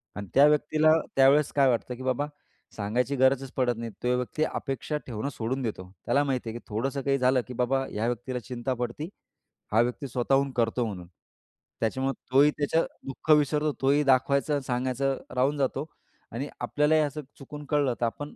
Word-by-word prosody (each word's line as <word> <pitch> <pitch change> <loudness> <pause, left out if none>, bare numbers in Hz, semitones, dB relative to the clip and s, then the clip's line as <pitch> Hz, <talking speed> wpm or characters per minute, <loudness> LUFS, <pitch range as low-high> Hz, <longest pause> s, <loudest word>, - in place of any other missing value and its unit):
आणि 100 -1 -6
त्या 140 +2 +7
व्यक्तीला 155 +1 +3 0.2
त्यावेळेस 135 +2 +5
काय 140 -2 +5
वाटतं 125 +1 -1
की 130 - -9
बाबा 130 +3 0 0.5
सांगायची 120 +7 -1
गरजच 130 0 +2
पडत 125 -2 +1
नाही. 115 0 -5
तो 125 0 +2
व्यक्ती 125 +5 -2
अपेक्षा 150 +1 -3
ठेवणं 120 +3 -3
सोडून 130 +1 -3
देतो. 95 -6 -5
त्याला 145 - +3
माहिती 130 -4 -2
आहे 120 +2 -6
की - - -25
थोडंसं 135 +6 -2
काही 135 0 +1
झालं 130 0 +3
की 125 - -7
बाबा 130 +2 +1
ह्या 110 +2 -2
व्यक्तीला 120 +1 -3
चिंता 125 +3 -3
पडती, 125 +7 -4 0.6
हा 110 +2 +5
व्यक्ती 125 +3 -2
स्वतःहून 135 +3 +1
करतो 120 0 +1
म्हणून. 90 -5 -6 0.7
त्याच्यामुळं 130 +4 0 0.2
तोही 140 +3 +6
त्याचं 155 +3 +1 0.2
दुःख 135 +3 -2
विसरतो 150 +1 +1
तोही 140 +2 +3
दाखवायचं 140 +2 +2
अन - - +1
सांगायचं 130 +1 -1 0.2
राहून 135 +4 +2
जातो 135 +1 -1 0.5
आणि 130 +6 -4
आपल्यालाही 150 +2 +2
असं 150 0 -2 0.2
चुकून 145 +2 -9
कळलं 145 -4 +2
तर 120 - +3
आपण 145 +6 -5
130 Hz, 175 wpm, -27 LUFS, 120-145 Hz, 0.7 s, त्या